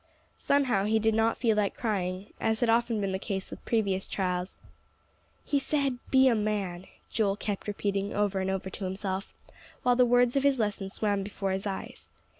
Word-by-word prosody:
Somehow 255 -9 +2
he 220 +1 +3
did 220 0 +2
not 225 +1 +2
feel 230 -3 +2
like 210 -2 0
crying, 190 -3 -2
as 220 0 +1
had 235 -2 +4
often 230 -1 +2
been 195 -1 -1
the 190 - -2
case 195 -1 -4
with - - -9
previous 200 -5 0
trials. 180 -1 -2 0.9
"He 285 - +2
said, 275 -3 0
'Be 265 0 +6
a 250 - +5
man,'" 205 -4 -2 0.2
Joel 200 -3 +1
kept 205 -1 -4
repeating 200 -1 -1
over 205 -2 0
and 190 0 -1
over 190 0 -2
to 195 - -5
himself, 190 +1 -4 0.5
while 245 0 +4
the 250 - +5
words 245 0 +4
of 275 - +3
his 280 -1 +3
lesson 205 -3 -1
swam 205 0 0
before 195 -1 -3
his 190 +2 -2
eyes. 195 - -6
205 Hz, 190 wpm, -29 LUFS, 195-230 Hz, 0.9 s, Be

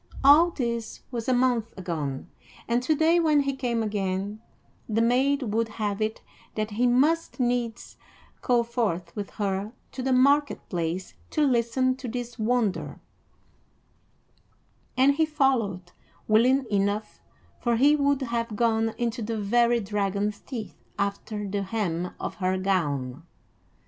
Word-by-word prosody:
All 300 +5 +7
this 235 -7 -3
was 235 -1 -3
a - - +4
month 245 -3 +1
agone, 155 -6 -4 0.4
and 235 +1 +1
to 310 +5 +1
day, 325 +3 +4
when 305 -3 +4
he 275 -1 -1
came 240 -4 -1
again, 200 0 -2 0.5
the 220 +1 +1
maid 260 +4 +2
would 230 +1 +1
have 210 -1 -3
it 215 +1 -2 0.3
that 215 0 -2
he 240 +4 +2
must 295 +7 +2
needs 240 -2 -1 0.4
go 240 -1 +2
forth 205 -8 -2
with 205 -2 -4
her 200 +1 -3 0.2
to 260 - -6
the 265 +1 0
market 280 +3 +3
place 175 +1 -3 0.2
to 305 - +2
listen 255 0 +2
to 260 -1 -7
this 245 0 -5
wonder; 220 -3 0 2.0
and 270 +2 +5
he 320 - +4
followed, 235 - 0 0.4
willing 255 +5 +4
enough, 205 +1 -1 0.4
for 240 -1 +1
he 285 +6 +5
would 280 -1 +1
have 235 -2 -2
gone 225 0 +1
into 235 0 -2
the 225 +1 -3
very 235 +3 +3
dragon's 205 0 -1
teeth 230 -6 -7 0.2
after 200 +1 -3
the 200 +1 -2
hem 185 -4 -2
of - - -4
her 185 -1 0
gown. 145 -9 -1
230 Hz, 140 wpm, -26 LUFS, 200-255 Hz, 2.0 s, All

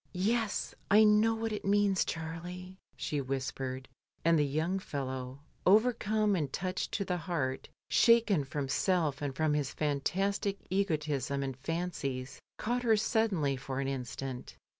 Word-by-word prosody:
"Yes, 215 +3 0 0.2
I 210 +2 +7
know 215 +1 +5
what 225 0 -2
it 210 - -4
means, 200 -1 +3
Charlie," 175 +3 -6 0.2
she 145 -2 -2
whispered; 130 0 -3 0.4
and 165 -1 +5
the - - +4
young 160 +7 0
fellow 130 -4 -5 0.2
overcome 215 0 +3
and 150 -6 -1
touched 185 +4 -2
to 200 - -1
the 180 -1 -1
heart, 155 -7 -2 0.2
shaken 225 -9 +4
from 135 +1 -3
self 155 -1 +1
and 140 -2 -3
from 155 0 +1
his 145 -2 0
fantastic 195 +7 0
egotism 150 -8 0
and 135 -1 -3
fancies, 140 -3 -3 0.2
caught 245 +2 -1
her 225 -3 +4
suddenly 210 - +1
for 130 +1 -4
an 135 - -1
instant. 130 -1 -5
165 Hz, 140 wpm, -31 LUFS, 135-200 Hz, 0.4 s, I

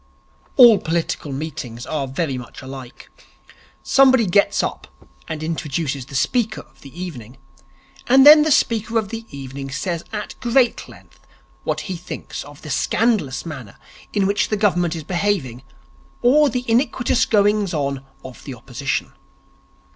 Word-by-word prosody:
All 235 -6 +8
political 165 -3 -2
meetings 135 -5 -6
are 145 -3 -3
very 135 +1 -2
much 125 +1 -9
alike. 130 -2 -10 0.7
Somebody 260 -4 +5
gets 200 +2 +2
up - - -4 0.4
and 155 -1 -5
introduces 150 -4 -3
the 140 - -10
speaker 220 - 0
of - - -24
the 140 - -11
evening, 135 -9 -8 0.7
and 265 +2 +6
then 300 +1 +10
the 310 - +2
speaker 230 -5 +1
of 215 -3 -1
the 225 0 -7
evening 135 0 -7
says 165 +4 -3
at 210 -1 -5
great 245 0 +1
length - - -17 0.5
what - - -1
he 190 - -5
thinks 175 +1 -7
of 145 0 -14
the 155 - -6
scandalous 205 - 0
manner 135 -11 -8 0.3
in 200 -2 +1
which 200 +1 +1
the 215 - 0
Government 175 -5 +1
is 160 - -6
behaving 170 - -1 0.6
or 285 +4 +5
the 250 -1 -3
iniquitous 240 -1 +1
goings 205 -2 +2
on 140 -4 -2 0.2
of 130 -1 -11
the 135 -4 -6
Opposition. 130 +3 -4
170 Hz, 145 wpm, -21 LUFS, 135-225 Hz, 0.7 s, then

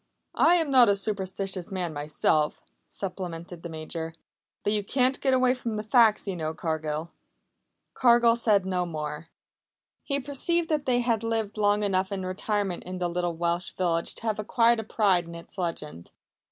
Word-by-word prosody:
"I 340 +2 +6
am 325 -5 +1
not 250 -4 +7
a 200 - +4
superstitious 195 -2 -2
man 180 -4 -3
myself," 150 +1 0 0.2
supplemented 175 -3 -6
the 170 - -7
Major. 160 +1 -5 0.5
"But 205 - +1
you 210 -1 0
can't 255 +5 +1
get 265 -2 +3
away 255 -1 +3
from 235 -3 -4
the 210 - -3
facts, 220 -1 +4
you 195 - -2
know, 160 -1 -3
Cargill." 160 0 -3 0.8
Cargill 235 -1 +5
said 210 -5 +3
no 180 -1 -1
more. 150 -1 -5 0.8
He 280 -1 -1
perceived 325 +5 -1
that 300 -3 -1
they 245 -1 +3
had 230 -2 0
lived 225 -2 -2
long 205 0 +2
enough 190 -1 0
in 190 -2 -3
retirement 195 0 -2
in 185 +1 -6
the 175 -1 -1
little 175 -1 -2
Welsh 170 +1 -1
village 170 -2 0
to - - -5
have 220 -2 -1
acquired 230 +2 +3
a - - -3
pride 195 -5 +2
in 170 0 -9
its 170 +2 -11
legend. 155 - -4
195 Hz, 175 wpm, -27 LUFS, 170-230 Hz, 0.8 s, not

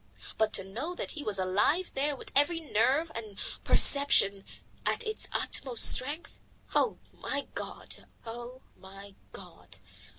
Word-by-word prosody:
But 220 -1 0
to - - -1
know 245 - -6
that - - -5
he 310 - -7
was 210 -5 +2
alive 205 - 0
there, 285 +2 -1
with - - -10
every 290 +4 +2
nerve 290 +2 0
and 215 -3 -8 0.3
perception 200 -9 +6 0.4
at - - 0
its 435 0 -4
utmost 255 -4 +2
stretch. 290 +6 -3 0.3
Oh! 460 - +1 0.2
my 280 -1 -5
God! - - -8 0.2
Oh! 240 +3 -9
my 195 +1 -14 0.2
God! 95 - -11
245 Hz, 135 wpm, -29 LUFS, 200-290 Hz, 0.4 s, perception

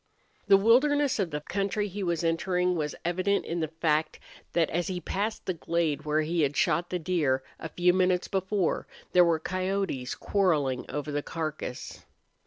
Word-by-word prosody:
The 200 -1 +7
wilderness 270 +6 +3
of 190 -4 0
the 150 -1 -4
country 200 +5 -1
he 200 +1 -6
was 170 -3 -1
entering 180 +2 +1
was 150 -3 -2
evident 185 +3 +1
in 170 +1 -3
the 160 - 0
fact 160 0 0 0.3
that 165 -2 +3
as 175 +2 -1
he 185 -2 -3
passed 210 +5 -3
the 185 - -1
glade 165 -3 -1
where 155 +1 +2
he 165 +2 0
had 145 -1 0
shot 175 +1 +2
the 180 - -1
deer 155 -7 0 0.2
a 160 - -6
few 180 +1 +3
minutes 185 -1 +2
before, 190 -1 -1 0.2
there 180 - +6
were 170 -2 +3
coyotes 185 -6 -2
quarreling 155 -10 0
over 150 +1 -4
the 145 0 -1
carcass. 155 -5 -5
175 Hz, 175 wpm, -28 LUFS, 155-190 Hz, 0.3 s, The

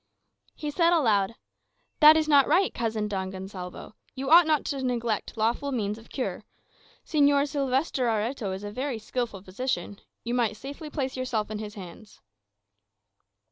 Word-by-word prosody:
He 300 -2 -4
said 335 +2 +3
aloud, 220 - +2 0.6
"That 305 +1 +9
is 310 -1 +1
not 285 -3 +5
right, 380 +2 +3
cousin 220 -2 -2
Don 190 -2 -3
Gonsalvo. 190 0 -8 0.2
You 270 +2 -3
ought 340 0 +8
not 305 -2 +2
to 275 -2 -3
neglect 235 -4 -2
lawful 235 +6 0
means 215 -4 -2
of 225 - -17
cure. 260 - -4 0.6
Señor 285 -1 +3
Sylvester 270 -2 0
Areto 225 -1 -1
is 190 +2 -5
a 205 - -5
very 255 +2 -3
skilful 220 -3 -4
physician; 200 -1 -3 0.2
you 235 - -3
might 230 -4 +1
safely 285 +5 -8
place 270 -3 -3
yourself 240 -5 -2
in 215 - -4
his 210 -1 -7
hands." 195 +2 -11
240 Hz, 155 wpm, -27 LUFS, 210-280 Hz, 0.6 s, That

